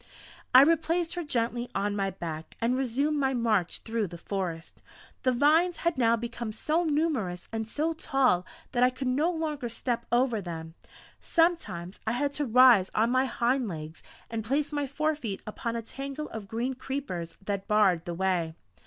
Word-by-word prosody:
I 255 +2 +10
replaced 330 +2 +2
her 350 - -3
gently 240 -3 -1
on 205 +1 0
my 195 -1 0
back 165 -4 -7
and 235 +2 +1
resumed 270 +4 0
my 265 -1 +1
march 215 -7 +1
through 225 -2 -1
the 170 0 -9
forest. 170 -3 -5 0.4
The 255 - +3
vines 315 +7 +3
had 340 - +2
now 230 -3 +4
become 235 -1 -5
so 310 +9 0
numerous 290 - -1
and 220 -1 -3
so 310 +7 -1
tall 270 - +2 0.3
that 245 - 0
I 250 - +6
could 255 +1 -6
no 285 +7 +2
longer 305 -7 -2
step 235 0 -3
over 240 -3 +2
them; 165 -3 -6 0.5
sometimes 325 - 0
I 220 - +2
had 285 +3 0
to 290 0 -1
rise 240 -5 +6
on 225 +2 +3
my 255 +1 +3
hind 245 0 0
legs 160 -3 -7 0.3
and 225 -1 -4
place 280 +7 0
my 290 -1 -1
forefeet 285 -7 -2
upon 230 +2 -4
a 230 - -3
tangle 275 +5 -6
of 220 -3 -7
green 235 +5 -2
creepers 255 -11 -5
that 200 0 -4
barred 195 -6 +3
the 175 - -4
way. 175 -3 0
240 Hz, 175 wpm, -28 LUFS, 200-285 Hz, 0.5 s, I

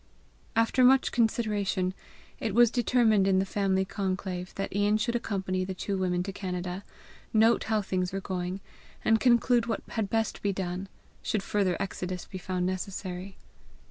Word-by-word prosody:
After 230 +3 +3
much 265 +1 +5
consideration, 210 -5 +1 0.5
it 215 -3 -2
was 240 -1 +6
determined 235 -5 +3
in 190 -1 +4
the 190 - +2
family 190 -1 +1
conclave, 190 -2 -3
that 195 -1 -4
Ian 205 +1 +3
should 225 +3 -1
accompany 190 -5 -1
the 190 0 -4
two 195 +2 -2
women 180 -2 0
to 195 +1 -5
Canada, 180 -1 -4 0.5
note 225 +1 +4
how 215 -2 +1
things 185 -1 -1
were 195 - -2
going, 185 0 -4 0.4
and 225 0 +4
conclude 240 -1 +4
what 225 -3 -2
had 220 -4 -2
best 225 -1 -1
be 200 - +1
done, 190 0 -4 0.3
should 210 -3 -1
further 195 -4 +1
exodus 185 -2 -4
be 185 - -8
found 180 0 -2
necessary. 185 0 -4
195 Hz, 160 wpm, -28 LUFS, 185-220 Hz, 0.5 s, was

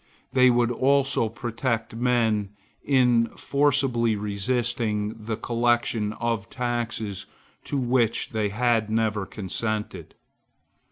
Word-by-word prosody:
They 130 -1 +6
would 120 -1 +2
also 135 -2 +2
protect 115 0 -3
men 115 -4 +1 0.3
in 125 -4 +3
forcibly 135 -5 +2
resisting 105 +1 -1
the 110 0 -5
collection 120 -2 0
of 115 -3 -2
taxes 115 -5 -3 0.4
to 145 - -2
which 120 -3 +1
they 110 -2 -1
had 115 0 +1
never 110 -3 0
consented. 105 +2 -4
115 Hz, 100 wpm, -25 LUFS, 110-125 Hz, 0.4 s, They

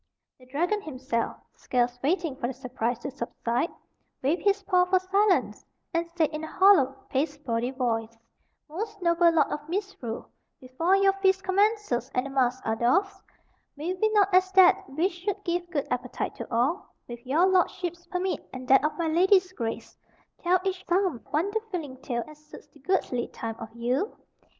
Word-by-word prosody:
The 255 - -18
dragon 350 +10 0
himself, 260 - -3 0.2
scarce 245 0 -1
waiting 325 0 0
for 250 -3 -3
the 265 - -4
surprise 250 -2 -2
to 280 - -4
subside, 240 +2 -2 0.5
waved 305 +7 +1
his 400 -1 +2
paw 365 -2 +3
for 370 +1 +3
silence, 385 +1 +1 0.3
and 335 0 -1
said, 330 -3 0
in 305 0 -5
a - - -4
hollow, 355 -8 +5 0.2
pasteboardy 270 -4 -1
voice: 230 -3 -2 0.5
"Most 415 +7 -5
noble 340 0 +4
Lord 325 -3 +2
of 295 +1 -5
Misrule, 355 - -4 0.3
before 295 +9 +1
your 390 0 +4
feast 385 0 +3
commences 405 - +1
and 250 +1 +1
the 275 - -6
masks 260 -1 0
are 220 - +1
doff'd, 260 - +1 0.6
may 325 +5 -2
we 435 +4 +1
not 405 -2 +3
as 370 +1 +4
that 380 -2 +5
which 325 +8 0
should 405 +2 -3
give 350 0 -2
good 295 -6 -1
appetite 250 0 -3
to 235 - -7
all, 255 +11 0
with 240 -1 -9
your 295 +8 +3
lordship's 355 -2 0
permit 365 +2 -2
and 255 -1 -8
that 270 +1 +6
of 300 - -1
my 335 -2 0
lady's 370 +3 +3
grace, 230 -8 -5 0.5
tell 365 +1 +3
each 375 -1 -2
some 360 -8 +1
wonder 385 +9 0
filling 315 -9 -5
tale 245 -3 -3
as 305 0 -15
suits 305 - -13
the 295 - -20
goodly 260 -7 0
time 225 -1 -6
of 225 - -7
Yule? 250 - -1
320 Hz, 175 wpm, -27 LUFS, 255-375 Hz, 0.6 s, that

